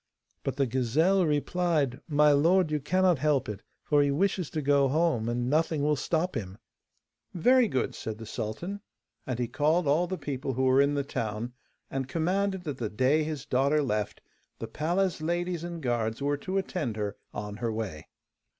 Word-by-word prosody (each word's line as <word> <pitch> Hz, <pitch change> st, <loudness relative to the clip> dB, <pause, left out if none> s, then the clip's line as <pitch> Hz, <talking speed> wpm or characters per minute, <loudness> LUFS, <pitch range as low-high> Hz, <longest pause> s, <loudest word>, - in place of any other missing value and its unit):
But -, -, -2 dB
the 140 Hz, -, +2 dB
gazelle 150 Hz, +10 st, +2 dB
replied: 150 Hz, -2 st, 0 dB
'My 150 Hz, -1 st, +4 dB
lord, 165 Hz, +4 st, +4 dB
you 150 Hz, -, +1 dB
cannot 180 Hz, +2 st, +2 dB
help 145 Hz, -2 st, +1 dB
it, 105 Hz, -2 st, -5 dB, 0.2 s
for 145 Hz, -1 st, +3 dB
he 145 Hz, -, +2 dB
wishes 180 Hz, +3 st, 0 dB
to 155 Hz, -, -3 dB
go 140 Hz, 0 st, +4 dB
home, 145 Hz, -6 st, +1 dB
and 120 Hz, +1 st, -1 dB
nothing 155 Hz, +1 st, +1 dB
will 150 Hz, 0 st, +3 dB
stop 165 Hz, +5 st, -1 dB
him.' 95 Hz, -4 st, -5 dB, 0.8 s
'Very 245 Hz, +7 st, +5 dB
good,' 130 Hz, -, -1 dB
said 110 Hz, -1 st, -5 dB
the 115 Hz, -, -8 dB
sultan, 120 Hz, -, -5 dB, 0.5 s
and 125 Hz, -2 st, -2 dB
he 120 Hz, -1 st, -1 dB
called 155 Hz, +7 st, +1 dB
all 160 Hz, +5 st, +3 dB
the 185 Hz, +1 st, -3 dB
people 135 Hz, -3 st, -3 dB
who 130 Hz, +2 st, -1 dB
were 130 Hz, +1 st, +5 dB
in 140 Hz, +1 st, +2 dB
the 140 Hz, -, 0 dB
town, 115 Hz, -2 st, -4 dB, 0.4 s
and 135 Hz, -1 st, -2 dB
commanded 185 Hz, +6 st, 0 dB
that 145 Hz, -6 st, -5 dB
the 110 Hz, -3 st, -2 dB
day 130 Hz, +9 st, +2 dB
his 150 Hz, -3 st, -4 dB
daughter 140 Hz, +4 st, +2 dB
left 105 Hz, -5 st, -2 dB, 0.4 s
the 115 Hz, -, -5 dB
palace 170 Hz, +8 st, 0 dB
ladies 175 Hz, +1 st, -1 dB
and 170 Hz, -2 st, -6 dB
guards 115 Hz, -3 st, -1 dB
were 145 Hz, +1 st, 0 dB
to 185 Hz, +6 st, -3 dB
attend 165 Hz, -, -2 dB
her 105 Hz, -1 st, -2 dB, 0.2 s
on 105 Hz, 0 st, -6 dB
her 115 Hz, +1 st, -2 dB
way. 105 Hz, -9 st, -5 dB
145 Hz, 185 wpm, -28 LUFS, 120-170 Hz, 0.8 s, Very